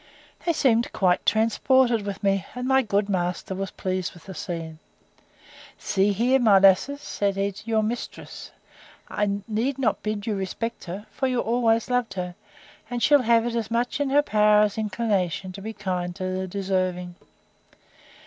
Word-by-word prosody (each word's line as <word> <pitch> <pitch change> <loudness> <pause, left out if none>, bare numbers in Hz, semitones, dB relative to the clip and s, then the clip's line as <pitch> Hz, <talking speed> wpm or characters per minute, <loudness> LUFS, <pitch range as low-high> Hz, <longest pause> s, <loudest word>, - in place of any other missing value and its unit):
They 335 - +3
seemed 240 -6 +2
quite 180 -2 +2
transported 230 0 +3
with 200 +1 -5
me: 195 -1 +2
and 250 0 -3
my 265 0 +4
good 205 -3 0
master 180 -1 -2
was 195 0 -3
pleased 185 -2 -3
with 175 - -15
the 190 - -8
scene. 165 -3 -6 1.0
See 195 +1 +1
here, 245 +6 +2
my 215 -5 +6
lasses, 195 +9 +4
said 200 -1 -1
he, 200 0 -1
your 220 -1 +1
mistress! 235 +3 -5 0.6
I 205 -1 -1
need 235 +5 -1
not 240 -6 0
bid 215 -1 -3
you 220 - -1
respect 205 +4 -4
her; 190 +4 -6
for 265 - -1
you 250 -1 0
always 230 -1 +1
loved 250 -3 -1
her; 180 -1 -4 0.6
and 245 -1 -3
she'll 290 -2 +6
have 230 -1 +3
it 240 - -2
as 230 -3 -2
much 240 +4 -1
in 285 -1 0
her 290 +2 +4
power 210 -3 +4
as 205 -1 0
inclination 200 -4 -1
to 195 - -9
be 220 +3 -5
kind 180 -4 -3
to 185 - -6
the 190 0 -3
deserving. 185 -2 -2
210 Hz, 170 wpm, -25 LUFS, 190-235 Hz, 1.0 s, my